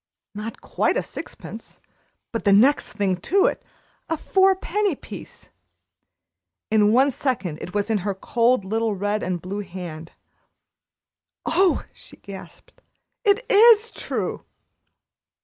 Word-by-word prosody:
Not 210 +2 -7
quite - - 0
a - - 0
sixpence, - - -9 0.5
but 230 - -3
the 200 - +4
next 245 +9 +4
thing 200 -3 0
to 385 - +2
it - - 0 0.5
a 325 - 0
four 385 +4 +3
penny 390 -1 -1
piece! - - -11 1.2
In 210 -1 +4
one 265 +4 +4
second 195 - -2
it 180 - -8
was 205 +2 0
in 215 - +2
her 195 +1 -2
cold, 235 +2 +1
little 220 +1 0
red 205 +2 -1
and 180 -1 -2
blue 190 +4 -5
hand. 175 -4 -8 1.3
"Oh!" 380 -1 +2
she - - -13
gasped. 195 -1 -12 0.4
"It 420 +3 +3
is 445 +1 +6
true!" - - -4
220 Hz, 130 wpm, -23 LUFS, 195-330 Hz, 1.3 s, is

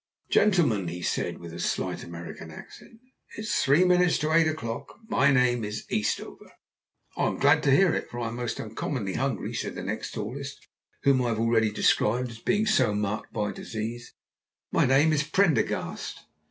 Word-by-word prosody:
"Gentlemen," 155 - +3
he 90 +1 -5
said, - - -1
with 85 -1 -10
a 85 - -7
slight - - -2
American 85 0 -8
accent, 225 - -13 0.4
"it - - -4
is 210 -1 -2
three 145 +6 +4
minutes 180 -1 +4
to 155 +1 -1
eight 165 -1 +5
o'clock. 115 -8 -4
My 140 -10 +3
name 125 -3 +3
is 105 +1 -5
Eastover!" 105 - -3 0.6
"I'm - - 0
glad 145 +2 +4
to 140 - +2
hear 180 +4 +5
it, - - -3
for 120 - -6
I'm 115 -1 -3
most 120 0 -3
uncommonly 110 -2 -3
hungry," 135 0 -2
said - - -4
the - - -5
next - - -4
tallest, - - -6 0.4
whom 135 -2 +4
I 125 - 0
have 110 -1 -1
already 115 -1 +3
described 120 +3 +1
as 115 - -11
being 205 - +1
so 130 - +3
marked 105 +1 -2
by 105 -2 -2
disease. 115 +2 -6 0.6
"My - - +3
name 145 +5 +4
is 150 - +2
Prendergast!" 175 +1 0
125 Hz, 175 wpm, -27 LUFS, 110-155 Hz, 0.6 s, eight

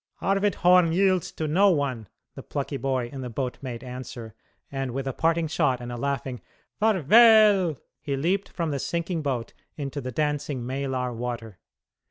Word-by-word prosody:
"Arvid 195 +1 +1
Horn 180 -1 +5
yields 185 -1 +2
to 155 - -3
no 190 +7 +4
one," 135 - -1 0.3
the - - -9
plucky 140 0 -4
boy 130 -3 -1
in 135 - -6
the 125 - -5
boat 125 +2 -4
made 125 -3 -6
answer, 125 -3 -8 0.4
and 135 -3 -3
with 135 0 -2
a 135 - -2
parting 165 +2 +1
shot 145 -5 +1
and 120 0 -7
a - - -4
laughing 130 -1 -3 0.4
"Farväl!" 210 - +6 0.2
he 140 -2 -2
leaped 180 +8 0
from 165 -3 -3
the 140 - -2
sinking 170 +3 -2
boat 130 -6 -3 0.2
into 140 -1 -4
the 130 0 -5
dancing 145 -2 -2
Maelar 130 -1 -2
water. 115 -4 -5
140 Hz, 170 wpm, -26 LUFS, 125-170 Hz, 0.4 s, Farväl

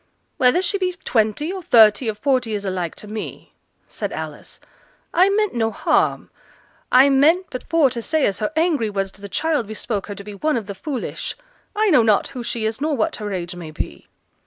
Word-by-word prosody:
'Whether 290 +7 +4
she 390 +2 0
be 365 -1 -1
twenty, 225 - +1
or 380 - -5
thirty, 225 - +5
or 215 - -2
forty, 250 -1 0
is 205 -1 -4
alike 185 -3 -3
to 210 - -10
me,' 215 +1 -7 0.3
said - - -5
Alice. - - -7 0.5
'I 370 +3 +5
meant 420 0 +1
no 225 -2 +1
harm. - - 0 0.6
I 260 +2 +7
meant 310 +7 +4
but 255 - -4
for 315 -6 +4
t' 235 -1 -4
say 310 +5 +1
as 195 - -1
her 215 - -1
angry 315 -9 +1
words 195 -1 -2
to 195 - -16
the 200 - -8
child 305 0 0
bespoke 215 -1 -4
her 205 - -6
to 200 - -9
be 210 +1 -9
one 300 +8 0
of 225 - -4
the 200 - -6
foolish. 265 +5 -5 0.4
I 425 -1 +2
know 260 - +6
not 215 -3 +2
who 250 -2 -6
she 230 -1 -3
is, 220 +4 -2
nor 300 -1 0
what 215 - 0
her 210 -1 -5
age 180 -1 -4
may 170 -3 -8
be.' 155 - -6
235 Hz, 210 wpm, -21 LUFS, 210-310 Hz, 0.6 s, I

